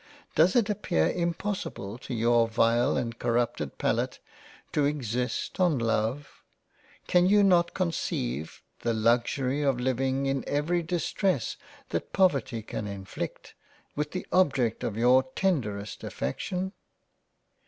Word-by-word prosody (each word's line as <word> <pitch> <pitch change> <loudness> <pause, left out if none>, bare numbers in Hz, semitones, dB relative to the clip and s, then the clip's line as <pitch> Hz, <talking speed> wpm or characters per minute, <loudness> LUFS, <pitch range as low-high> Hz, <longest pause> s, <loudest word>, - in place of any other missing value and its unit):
Does 165 +4 +4
it 235 -4 +4
appear 135 - +1
impossible 170 - -3
to 125 - -5
your 115 0 +3
vile 115 +4 +2
and 115 -2 -3
corrupted 115 - -1
Palate, - - 0 0.5
to 150 - +1
exist 125 - -2
on 175 -6 +3
Love? 115 +4 -1 0.6
Can 180 0 +4
you 205 0 +5
not 175 -3 +4
conceive 80 - -2 0.2
the 115 -1 0
Luxury 125 +5 +1
of 135 -4 +1
living 130 +2 0
in 135 -1 0
every 155 +5 +1
distress 175 - -1 0.3
that - - -3
Poverty 135 - +2
can 105 -1 -5
inflict, 95 -2 -6 0.4
with 150 0 -1
the 185 +3 -5
object 140 -11 +2
of 105 - -2
your 125 +3 +5
tenderest 110 - -1
affection 185 - -3
130 Hz, 120 wpm, -28 LUFS, 115-170 Hz, 0.6 s, you